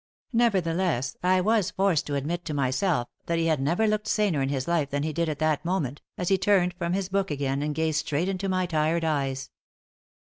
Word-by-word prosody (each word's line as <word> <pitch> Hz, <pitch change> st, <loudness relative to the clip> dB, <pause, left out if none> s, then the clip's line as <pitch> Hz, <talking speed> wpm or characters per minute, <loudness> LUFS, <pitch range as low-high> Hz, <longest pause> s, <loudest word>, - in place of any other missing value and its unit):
Nevertheless, 180 Hz, -, +1 dB
I 185 Hz, +1 st, +3 dB
was 210 Hz, -1 st, +2 dB
forced 190 Hz, -6 st, +1 dB
to 145 Hz, -, -2 dB
admit 165 Hz, +5 st, -2 dB
to 150 Hz, -, -3 dB
myself 135 Hz, 0 st, +1 dB, 0.2 s
that 170 Hz, -, 0 dB
he 165 Hz, -, +1 dB
had 155 Hz, -4 st, +1 dB
never 170 Hz, +10 st, +1 dB
looked 215 Hz, 0 st, 0 dB
saner 205 Hz, -9 st, +1 dB
in 135 Hz, -, 0 dB
his 135 Hz, -2 st, -2 dB
life 165 Hz, -5 st, +1 dB
than 145 Hz, +1 st, -1 dB
he 155 Hz, 0 st, -2 dB
did 170 Hz, +1 st, 0 dB
at 150 Hz, -, -3 dB
that 155 Hz, 0 st, +1 dB
moment, 165 Hz, -6 st, -2 dB, 0.2 s
as 180 Hz, -, -1 dB
he 195 Hz, -1 st, +3 dB
turned 185 Hz, -3 st, +3 dB
from 170 Hz, 0 st, -2 dB
his 190 Hz, -1 st, -1 dB
book 195 Hz, 0 st, 0 dB
again 140 Hz, -2 st, -1 dB
and 150 Hz, 0 st, -2 dB
gazed 160 Hz, -1 st, +1 dB
straight 150 Hz, +4 st, -1 dB
into 195 Hz, 0 st, -2 dB
my 185 Hz, -1 st, +1 dB
tired 165 Hz, 0 st, 0 dB
eyes. 135 Hz, -3 st, -1 dB
165 Hz, 215 wpm, -26 LUFS, 145-185 Hz, 0.2 s, I